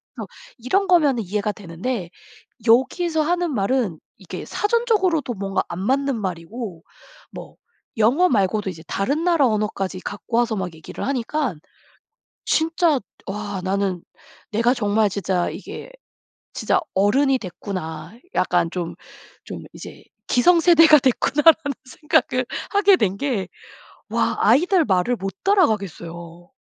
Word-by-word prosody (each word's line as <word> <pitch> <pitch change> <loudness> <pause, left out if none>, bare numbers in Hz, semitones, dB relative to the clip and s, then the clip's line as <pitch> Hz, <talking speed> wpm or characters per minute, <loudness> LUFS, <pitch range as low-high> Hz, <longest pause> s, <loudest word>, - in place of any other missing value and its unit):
그래서 - - -6 0.3
이런 375 - 0
거면 300 -9 +4
이해가 210 +1 -2
되는데 190 +1 -5 0.6
여기서 310 +8 +3
하는 350 +1 0
말은 205 -5 0 0.2
이게 - - -8
사전적으로도 415 - +1
뭔가 195 0 -2
안 170 - -5
맞는 270 +3 0
말이고 185 0 -6 0.5
뭐 - - -10 0.4
영어 260 +12 +4
말고도 200 - +1
이제 165 -3 -9
다른 280 +11 -1
나라 335 -6 +3
언어까지 210 -4 -2
갖고 215 +4 -4
와서 240 -2 +1
막 180 -3 -4
얘기를 160 - -7
하니깐 260 - -2 0.9
진짜 320 -2 +2 0.3
와 205 -1 -4
나는 190 -2 -1 0.5
내가 235 +4 +2
정말 210 -2 +1
진짜 185 -2 -1
'이게 - - -9 0.6
진짜 - - +1
어른이 260 +8 +3
됐구나.' 180 -4 -7 0.2
약간 175 -2 +1
좀 175 -2 -4 0.5
좀 - - -8
'이제 - - -11 0.3
기성세대가 330 +2 +6
됐구나.' 265 +3 +1
라는 315 -4 +5
생각을 260 -3 0 0.2
하게 400 -1 +5
된 195 - 0
게 230 -10 -2 0.6
와 - - 0
아이들 355 +2 +4
말을 190 +6 +1
못 195 -2 -5
따라가겠어요. 175 - -1
230 Hz, 270 characters per minute, -22 LUFS, 190-305 Hz, 0.9 s, 기성세대가